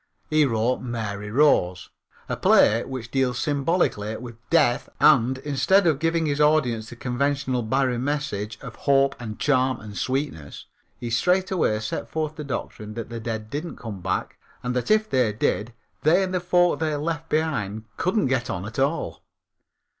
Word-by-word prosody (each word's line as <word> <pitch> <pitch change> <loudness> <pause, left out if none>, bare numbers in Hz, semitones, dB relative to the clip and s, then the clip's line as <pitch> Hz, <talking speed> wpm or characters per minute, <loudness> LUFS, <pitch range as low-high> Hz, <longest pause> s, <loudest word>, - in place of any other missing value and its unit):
He 155 -1 +5
wrote 115 0 +1
Mary 105 -4 -4
Rose, 105 -9 +2 0.4
a - - -2
play 115 +2 +4
which 125 -3 -6
deals 130 -2 +1
symbolically 140 - 0
with 120 -1 -9
death 145 -8 +3
and, 130 -3 +5
instead 150 +8 +2
of 155 -5 +3
giving 165 0 +1
his 145 0 0
audiences 125 -8 +2
the - - -9
conventional 130 +1 -1
Barrie 125 +1 0
message 125 -7 -2
of 130 -5 -9
hope 135 -1 +3
and 110 -3 -6
charm 130 -3 +2
and 105 -2 -10
sweetness, 130 - -3 0.3
he 120 - -5
straightway 180 - +2
set 115 +2 -4
forth 155 +1 -2
the 155 - -6
doctrine 110 -6 -5
that 115 -2 -5
the 115 -1 -5
dead 110 -1 -5
didn't 155 +4 -4
come 105 -5 -7
back 95 +1 -3 0.2
and 125 0 -2
that 125 - -1
if 215 0 +3
they 125 - +2
did 105 +2 -1 0.3
they 175 +6 +4
and 185 -1 -3
the 180 - +1
folk 175 0 +2
they 155 -2 0
left 160 +2 -3
behind 120 -10 -1
couldn't 195 +3 +1
get 130 -1 0
on 95 -4 -3
at 110 +5 -6
all. 140 +5 -1
130 Hz, 170 wpm, -24 LUFS, 115-150 Hz, 0.4 s, He